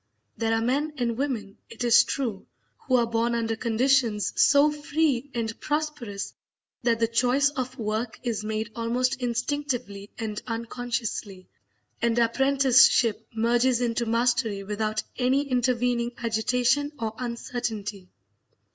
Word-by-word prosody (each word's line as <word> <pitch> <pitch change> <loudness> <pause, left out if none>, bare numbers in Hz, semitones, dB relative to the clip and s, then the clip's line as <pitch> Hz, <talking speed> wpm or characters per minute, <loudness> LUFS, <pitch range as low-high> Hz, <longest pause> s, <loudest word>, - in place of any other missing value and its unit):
There 225 -1 -1
are 225 - 0
men 285 +6 0
and 235 -2 -1
women, 230 -6 -3
it 230 +1 -6
is 240 0 +6
true, 235 -8 -3 0.4
who 255 - +3
are 240 -1 +4
born 230 +1 0
under 225 -1 -1
conditions 235 -1 +1
so 285 +1 +5
free 290 -3 0
and 225 -1 -3
prosperous 295 -10 -3 0.5
that 235 -2 +1
the 230 - +3
choice 250 +4 +3
of 260 -1 -4
work 220 +1 -3
is 225 -4 -2
made 220 +1 -3
almost 250 +3 0
instinctively 245 -4 -2
and 215 -2 -4
unconsciously, 230 -4 -4 0.5
and 235 0 +1
apprenticeship 260 -1 +4
merges 240 +2 +2
into 235 -1 -1
mastery 230 -3 +1
without 215 +1 -2 0.2
any 265 +3 +2
intervening 245 -1 0
agitation 250 +5 +1
or 225 -3 -3
uncertainty. 230 -5 -4
235 Hz, 125 wpm, -26 LUFS, 225-255 Hz, 0.5 s, is